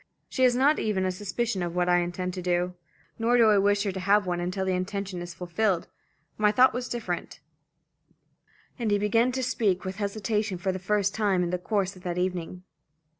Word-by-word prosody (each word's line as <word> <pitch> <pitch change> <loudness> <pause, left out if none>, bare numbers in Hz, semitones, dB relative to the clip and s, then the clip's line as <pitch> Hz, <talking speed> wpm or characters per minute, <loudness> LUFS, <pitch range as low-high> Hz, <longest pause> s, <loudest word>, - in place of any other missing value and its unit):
She 260 - -3
has 245 -1 +4
not 280 +4 +3
even 195 -4 0
a 185 - +1
suspicion 205 +2 -2
of 175 0 -3
what 180 0 +1
I 175 0 +4
intend 180 +1 -3
to 185 - -5
do. 180 0 0 0.5
Nor 235 +2 +3
do 225 -2 +6
I 205 - +5
wish 200 +1 +2
her 200 - -1
to 190 - -5
have 200 +2 +3
one 175 -1 -1
until 185 +2 -2
the 190 - 0
intention 185 0 -3
is 175 0 -7
fulfilled. 180 +1 -1 0.5
My 210 -1 +4
thought 255 +4 +5
was 250 0 -4
different" 215 -8 -4 1.4
and 230 -3 0
he 205 - +3
began 225 +4 +2
to 260 0 -2
speak 205 -7 0
with 190 +1 -4
hesitation 210 -1 -1
for 190 +2 -1
the 185 - -4
first 200 +1 0
time 200 -4 +1
in 175 - -2
the 180 - -1
course 195 0 -1
of 185 - -14
that 175 -1 -4
evening. 180 0 -3
195 Hz, 210 wpm, -27 LUFS, 180-215 Hz, 1.4 s, do